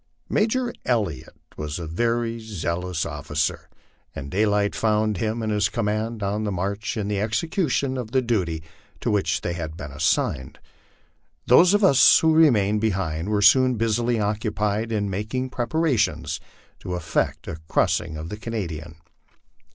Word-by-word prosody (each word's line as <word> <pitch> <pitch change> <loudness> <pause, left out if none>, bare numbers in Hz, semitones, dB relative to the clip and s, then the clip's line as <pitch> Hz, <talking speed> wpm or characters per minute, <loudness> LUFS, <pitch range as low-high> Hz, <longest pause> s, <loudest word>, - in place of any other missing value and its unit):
Major 235 +3 +1
Elliot 105 - -2 0.2
was 75 -1 -4
a 85 - -5
very 115 +7 -1
zealous 90 -5 -3
officer, 75 +2 -3 0.5
and 70 +1 -6
daylight 105 +1 +2
found 110 -2 +1
him 110 +2 -2
and 110 - -1
hia 105 -1 +2
command 110 0 -2
on 105 +2 -1
the 105 - -1
march 100 +5 -3
in 105 -2 -2
the 100 -1 -1
execution 135 - 0
of 120 -4 -4
the 130 +2 +1
duty 90 -9 -1 0.4
to - - 0
which 105 -2 +1
they 85 - -2
had 80 -2 -5
been 75 -4 -7
as - - -5
signed. 65 0 0 0.9
Those 175 +10 +6
of 205 - +2
us 140 -9 +7
who 160 0 +3
remained 105 -10 +4
behind 95 -5 -1
were 105 -1 +1
soon 130 +4 +6
busily 115 +1 0
occupied 105 +1 -1
in 105 -2 0
mak 105 +5 -4
ing 130 0 -2
preparations 130 +1 0 0.4
to 90 - -4
effect 85 -3 -2
a 80 - -5
crossing 80 0 0
of 80 +2 -6
the 105 - -6
Canadian. 85 -9 -5
105 Hz, 155 wpm, -24 LUFS, 90-115 Hz, 0.9 s, us